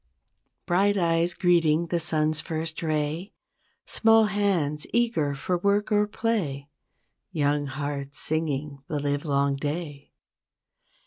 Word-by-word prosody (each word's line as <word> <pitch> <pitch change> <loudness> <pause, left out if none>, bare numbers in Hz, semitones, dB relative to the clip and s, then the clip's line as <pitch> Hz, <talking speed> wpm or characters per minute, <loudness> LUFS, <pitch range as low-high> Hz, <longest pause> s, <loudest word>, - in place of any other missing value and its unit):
Bright 200 +3 +2
eyes 170 -1 +1
greeting 170 -2 +3
the 170 - 0
sun's 155 -2 +1
first 160 0 -4
ray 155 +3 -2 0.5
Small 225 -1 +4
hands 190 -8 0
eager 230 -12 +1
for 175 +6 -2
work 200 +3 +1
or 210 0 +3
play 175 -12 -2 0.6
Young 145 -1 0
hearts 140 0 -4
singing 150 -3 -2
the 150 - -2
livelong 140 -1 0
day. 145 0 -5
155 Hz, 110 wpm, -26 LUFS, 145-180 Hz, 0.6 s, Small